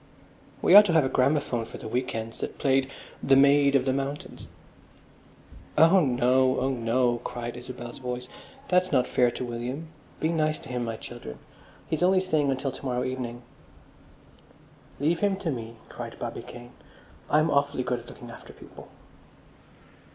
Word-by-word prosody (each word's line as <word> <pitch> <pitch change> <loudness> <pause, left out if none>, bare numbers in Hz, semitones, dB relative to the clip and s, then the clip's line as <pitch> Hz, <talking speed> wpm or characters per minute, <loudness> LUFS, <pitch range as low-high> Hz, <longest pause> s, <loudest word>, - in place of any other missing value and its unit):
"We - - +5
ought 205 +1 +11
to 175 - 0
have 160 -4 +4
a - - 0
gramophone 130 -3 +1
for - - -10
the - - -8
week 125 +2 -2
ends 115 0 -5
that - - -5
played 135 -1 +2 0.3
'The 135 - +4
Maid 140 +1 +5
of 130 -1 +3
the 130 - +1
Mountains.'" 140 +2 -5 1.3
"Oh 165 +4 +7
no! 130 0 +2
Oh 130 +1 0
no!" 120 0 +1
cried 120 0 -6
Isabel's 120 -1 -8
voice. 125 -1 -5 0.4
"That's 180 0 +2
not 130 -4 +2
fair 125 -1 +3
to 125 +1 -5
William. 125 +7 -5 0.3
Be 160 - 0
nice 155 -2 0
to - - -13
him, 125 -1 -2
my 115 -1 -3
children! 120 - -9 0.5
He's 160 - -2
only 185 +1 +4
staying 155 -6 +1
until 135 0 -1
to 130 - -11
morrow 125 -2 -1
evening." 125 -2 -5 1.6
"Leave 160 +4 +1
him 200 -1 +2
to 190 -4 -3
me," 115 -3 -6
cried - - -8
Bobby - - -5
Kane. 120 0 -11 0.6
"I'm 155 +1 +3
awfully 140 -2 +1
good 125 0 -1
at 120 - -15
looking 120 -1 -11
after - - -12
people." - - -14
130 Hz, 165 wpm, -27 LUFS, 120-145 Hz, 1.6 s, ought